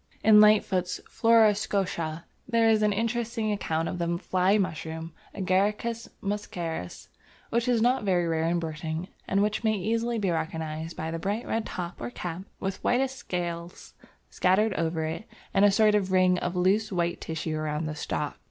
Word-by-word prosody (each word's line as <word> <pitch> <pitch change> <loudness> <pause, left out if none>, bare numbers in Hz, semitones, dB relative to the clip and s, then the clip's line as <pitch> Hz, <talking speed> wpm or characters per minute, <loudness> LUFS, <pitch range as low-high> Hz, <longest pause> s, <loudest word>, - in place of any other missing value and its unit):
In 210 -1 +8
Lightfoot's 190 -4 +3
Flora 225 -2 +5
Scotica, 185 -6 -2 0.2
there 230 -2 +3
is 220 -1 +4
an 210 -1 +3
interesting 230 +1 -1
account 165 -5 -1
of 180 - -4
the 170 0 0
Fly 185 +2 +2
Mushroom 160 -3 -3 0.2
(Agaricus 205 +4 0
muscarius) 175 - -4 0.4
which 235 +1 +1
is 235 -3 +3
not 250 0 +2
very 180 -3 +2
rare 160 0 0
in 170 +1 +1
Britain, 160 +1 -4 0.2
and 195 +1 +2
which 210 +2 -1
may 220 -1 +3
be 190 +1 -4
easily 230 0 0
recognized 160 -3 -3
by 160 +1 -3
the 165 - -3
bright 205 +7 -2
red 225 -1 -2
top 175 -1 -6
or 120 - -3
cap, 175 +6 -5 0.2
with 190 0 -4
whitish 260 +2 +2
scales 175 -7 -5 0.4
scattered 195 +3 +2
over 165 -2 -1
it, 160 +7 -4 0.3
and 195 +1 +5
a - - +7
sort 210 +1 +4
of 195 -3 +1
ring 185 -1 +4
of 175 +1 -3
loose 200 +4 +2
white 170 -2 -1
tissue 160 -1 -3
round 155 0 -2
the 155 - -3
stalk. 150 - -3
185 Hz, 170 wpm, -27 LUFS, 165-215 Hz, 0.4 s, In